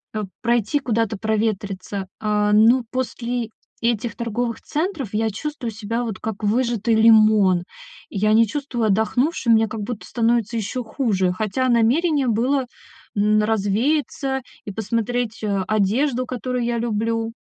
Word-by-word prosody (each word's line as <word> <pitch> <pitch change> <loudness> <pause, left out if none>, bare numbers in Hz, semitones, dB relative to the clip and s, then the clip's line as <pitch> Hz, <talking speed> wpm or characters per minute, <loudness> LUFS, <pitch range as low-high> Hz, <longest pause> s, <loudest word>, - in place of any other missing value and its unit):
э, 215 - -1 0.2
пройти 235 +4 +1
куда-то 225 -5 -1
проветриться, 205 -3 -2
а, 210 -1 +1
но 235 +4 +5
после 245 -2 -3 0.3
этих 230 0 0
торговых 235 0 -3
центров 310 - -3
я 220 +1 +1
чувствую 250 +2 -5
себя, 225 +3 -3
вот, 220 -5 -4
как 220 -1 -5
выжатый 230 0 +1
лимон. 215 -5 +5 0.5
Я 215 +2 +1
не 225 +1 +5
чувствую 260 -2 -2
отдохнувшим, 235 - +2
мне 225 0 +4
как 215 0 -5
будто 215 +1 -5
становится 235 -1 +1
ещё 230 +4 -3
хуже. 210 -6 0
Хотя 220 +6 -1
намерение 265 +5 +2
было, 250 +4 +1 0.5
н 210 +1 +3
развеяться 260 +6 0 0.2
и 200 - -5
посмотреть, 230 +2 -2
э, 200 -2 0
одежду, 235 +6 +1
которую 250 0 -3
я 235 0 -1
люблю. 225 0 -1
225 Hz, 135 wpm, -22 LUFS, 215-245 Hz, 0.5 s, но